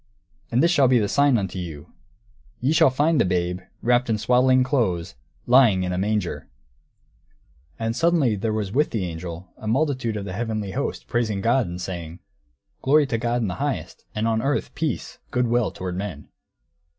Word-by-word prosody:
_ - - -43 0.5
And 120 +4 +3
this 170 - +4
shall 140 -6 +4
be 125 0 +4
a 105 -3 +1
sign 140 +1 +3
unto 95 -2 -3
you: 80 -4 -8 0.7
ye 130 +4 +1
shall 160 -2 +6
find 150 +4 +2
the - - +5
babe, 90 0 -1 0.2
wrapped 120 +1 +2
in 110 - +2
swaddling 125 +3 +4
clothes, 110 - 0 0.3
lying 120 -7 +5
in 90 0 -2
a - - -2
manger." 105 -2 -2 1.3
And 115 0 -2
suddenly 160 -8 +2
there 110 +3 -2
was 105 -3 -2
with 150 +7 +2
the 105 -5 -2
angel 85 +1 -7
a 110 - -8
multitude 130 -3 0
of 100 - -5
the 95 - -5
heavenly 110 -2 -3
host, - - -3
praising 110 - -1
God, 115 +3 +2
and 85 +1 -6
saying, 85 -3 -6 0.6
"Glory 145 +2 +4
to 115 -4 -2
God 120 +1 0
in - - 0
the 90 - -5
highest, - - -3
and 110 +1 0
on 110 -1 +1
earth 140 +3 -1
peace, 160 -1 -3
good 125 -2 +1
will 120 -2 +1
toward 90 -1 -5
men." 90 -6 -6
110 Hz, 185 wpm, -23 LUFS, 95-130 Hz, 1.3 s, shall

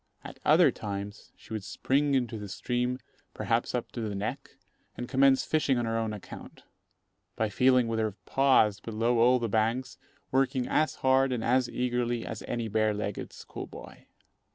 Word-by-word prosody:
At - - -10
other - - +6
times, 100 0 -6
she - - -11
would 110 -3 -3
spring 140 +7 +1
into 120 -4 -1
the 105 -1 -7
stream, 125 +5 -1 0.4
perhaps - - 0
up - - -3
to 120 - -5
the 105 -2 -3
neck, 120 +8 -5 0.4
and 120 - -4
commence 135 +1 +4
fishing 145 -4 +1
on 120 - 0
her 115 0 -1
own 115 -1 -1
account, 105 -2 -10 0.7
by 110 -1 0
feeling 125 +2 +3
with 115 -1 -1
her 110 -3 -1
paws 130 -7 +3
below 115 +3 0
all 125 +2 +5
the 120 -2 -2
banks, 115 +6 -1 0.3
working 130 -1 +1
as 155 0 +1
hard 130 0 +4
and 120 -3 -2
as 125 0 +2
eagerly 120 -1 -1
as 110 - -6
any 115 -1 -2
bare 110 0 +1
legged 105 -1 -4
school - - -8
boy. - - -12
120 Hz, 175 wpm, -29 LUFS, 110-130 Hz, 0.7 s, other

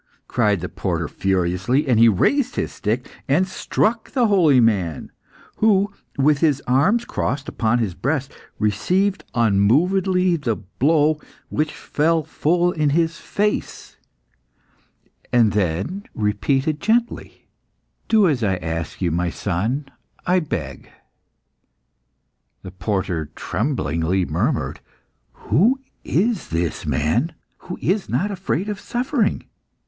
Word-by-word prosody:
cried 105 -6 +1
the 90 - -3
porter 85 -4 -2
furiously; 95 - 0
and 120 -4 +3
he 115 0 +7
raised 250 - +1
his - - -2
stick 115 +4 -2 0.2
and 170 +7 +2
struck 220 +4 -1
the 250 -3 +2
holy 175 - +4
man, 95 - +1 0.5
who, 205 -1 +3 0.2
with 140 +1 +3
his 145 -4 +2
arms 185 - +2
crossed 140 - -2
upon 115 +1 0
his 110 -6 -1
breast, 140 - -2 0.2
received 185 - +1
unmovedly 175 - +3
the 120 -7 -1
blow, 150 - +1 0.3
which 150 0 -1
fell 160 +2 0
full 175 +4 +1
in 155 -4 +1
his 165 +2 +1
face, 210 +1 -2 1.3
and 115 -3 +4
then 100 - -1
repeated 135 +8 0
gently 235 +2 -1 0.6
"Do 215 -4 +4
as 135 -7 0
I 95 -3 +2
ask 80 +1 -4
you, 85 - +1
my 85 +2 0
son, 110 - -2 0.4
I 180 +1 +3
beg." 80 - -5 1.7
The 95 - -8
porter 90 -5 -2
tremblingly 90 - -1
murmured 110 - -1 0.5
"Who 235 - +2 0.2
is 205 +5 0
this 85 0 -2
man 120 - 0 0.2
who 180 - -7
is 195 +2 0
not 180 - 0
afraid 190 -1 -2
of 210 -2 -4
suffering?" 245 -1 -1
135 Hz, 120 wpm, -21 LUFS, -, 1.7 s, he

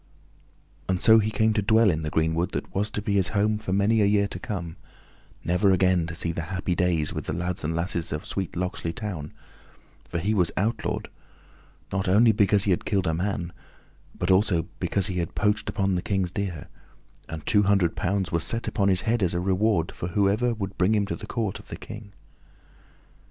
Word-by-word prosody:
And 95 -1 +1
so 110 +3 +7
he 110 0 0
came 110 -1 +2
to 105 - +1
dwell 110 +1 +4
in 80 -1 -2
the 75 - -3
greenwood 80 +2 0
that - - -4
was 105 +3 0
to 105 - -4
be 105 - -1
his 95 -2 +3
home 105 +1 +2
for 105 -3 -5
many 100 +3 +3
a - - +4
year 100 0 +3
to 90 - -6
come, 85 -4 -5 0.7
never 90 +4 +2
again 95 -2 +3
to 80 - -6
see 85 0 -1
the 85 - -3
happy 95 -1 -1
days 85 -4 0
with - - -5
the - - -3
lads 90 +1 -3
and 80 +2 -1
lasses 85 0 -2
of 75 0 -4
sweet 95 -3 -4
Locksley 90 -2 -3
Town; 90 -9 -5 0.8
for - - -3
he 100 +6 0
was 90 -5 +2
outlawed, 110 +5 -1 0.8
not 95 0 -1
only 110 +4 +6
because 105 -2 +3
he 100 - +1
had 90 - +1
killed 95 -4 0
a 80 - +1
man, 90 0 -2 0.6
but 90 +2 0
also 95 -3 +3 0.2
because 100 - 0
he 95 -3 -1
had 85 - -4
poached 105 +1 +1
upon 100 -2 0
the 90 - 0
King's 95 -2 -1
deer, 90 -5 -4 0.6
and 80 -1 -7
two 105 - +4
hundred 100 -4 +2
pounds 95 +1 -1
were 85 - +1
set 115 +8 -1
upon 100 -3 +1
his 95 -1 +3
head, 115 +3 0
as 90 -2 +1
a - - +1
reward 95 -1 +1
for 85 - -5
whoever 100 +6 +2
would 100 -2 -6
bring 95 +4 +3
him 105 -1 +2
to 100 - -3
the 110 - -9
court 110 -6 -2
of - - -15
the - - -7
King. 105 -1 -10
95 Hz, 210 wpm, -25 LUFS, 85-105 Hz, 0.8 s, so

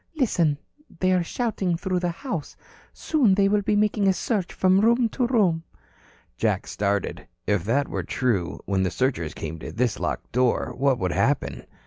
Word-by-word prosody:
"Listen. 170 - +2 0.4
They 185 0 +2
are 185 -1 +3
shouting 190 -2 -1
through 185 0 -1
the 175 0 -1
house. 175 - -5 0.3
Soon 255 -12 +2
they 200 0 +4
will 205 +1 +2
be 210 +1 +1
making 210 -1 +2
a 190 - +5
search 195 -2 -2
from 185 +1 +3
room 235 +1 +3
to 245 +2 0
room." 195 -10 +2 0.8
Jack - - 0
started. 100 -1 -2 0.2
If 100 -4 0
that 140 +6 +1
were - - -3
true, 105 -9 -1
when 95 -1 0
the 95 - +1
searchers 105 - -1
came 80 +1 -6
to - - -7
this 120 -2 -1
locked - - -3
door, 125 0 +1
what 135 -1 +2
would 90 -3 -1
happen? 70 - 0
170 Hz, 175 wpm, -25 LUFS, -, 0.8 s, a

